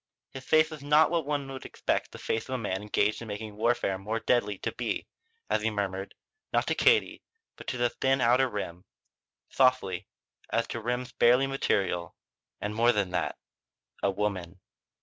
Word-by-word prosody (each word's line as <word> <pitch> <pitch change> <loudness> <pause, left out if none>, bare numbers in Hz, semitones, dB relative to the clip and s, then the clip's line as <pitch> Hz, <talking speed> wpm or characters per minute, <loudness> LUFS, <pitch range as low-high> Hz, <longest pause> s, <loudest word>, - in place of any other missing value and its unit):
His 135 - -8
face 155 +2 +4
was 155 -2 -8
not 150 +2 +4
what 165 -4 0
one 145 -2 -1
would 130 -1 -7
expect - - -2
the - - -9
face 115 +3 -2
of 130 - -1
a - - 0
man 100 -4 -2
engaged 105 +1 +1
in 115 - -7
making 105 0 -6
warfare 110 -4 +1
more 110 +4 -2
deadly 115 -3 +1
to - - -3
be - - -3 0.4
as - - +1
he 110 - +1
murmured, 100 -2 -3 0.4
not - - +2
to - - +1
Katie 440 -1 +3 0.3
but - - -12
to 125 - -2
the 120 0 +2
thin 135 0 +1
outer 125 +2 +4
rim, 90 -5 -5 0.6
softly, 130 -9 +2 0.4
as - - +1
to 115 - -4
rims 125 +2 -2
barely 125 +3 +4
material: 95 -10 0 0.4
"And 105 +1 -3
more 115 +2 +4
than 100 -5 0
that 90 - -1 0.6
a - - +2
woman." 95 -3 -2
115 Hz, 180 wpm, -29 LUFS, 100-130 Hz, 0.6 s, face